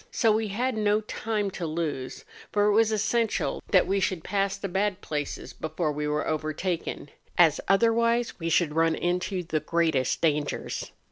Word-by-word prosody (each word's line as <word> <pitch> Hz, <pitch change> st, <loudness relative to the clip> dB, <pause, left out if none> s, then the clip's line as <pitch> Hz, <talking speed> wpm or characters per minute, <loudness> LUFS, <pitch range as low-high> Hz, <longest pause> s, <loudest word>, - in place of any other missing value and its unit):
So 225 Hz, -3 st, +2 dB
we 220 Hz, +1 st, +1 dB
had 240 Hz, +5 st, -1 dB
no 210 Hz, 0 st, +2 dB
time 215 Hz, -1 st, -2 dB
to 175 Hz, -2 st, -4 dB
lose, 155 Hz, -5 st, -4 dB, 0.3 s
for 205 Hz, 0 st, +2 dB
it 210 Hz, -, +4 dB
was 225 Hz, +1 st, +4 dB
essential 220 Hz, +1 st, 0 dB
that 185 Hz, -3 st, +5 dB
we 195 Hz, +1 st, +1 dB
should 185 Hz, -4 st, -1 dB
pass 195 Hz, -1 st, 0 dB
the 200 Hz, -, -4 dB
bad 195 Hz, +1 st, 0 dB
places 150 Hz, -2 st, -4 dB
before 160 Hz, 0 st, -2 dB
we 150 Hz, 0 st, -3 dB
were 150 Hz, +1 st, -1 dB
overtaken, 155 Hz, 0 st, -3 dB, 0.3 s
as 165 Hz, -4 st, +5 dB
otherwise 230 Hz, +3 st, +2 dB
we 165 Hz, -1 st, -2 dB
should 165 Hz, -2 st, +2 dB
run 165 Hz, 0 st, +3 dB
into 180 Hz, +2 st, -1 dB
the 160 Hz, -2 st, -1 dB
greatest 160 Hz, -4 st, +1 dB
dangers. 150 Hz, -3 st, -1 dB
185 Hz, 165 wpm, -27 LUFS, 160-210 Hz, 0.3 s, that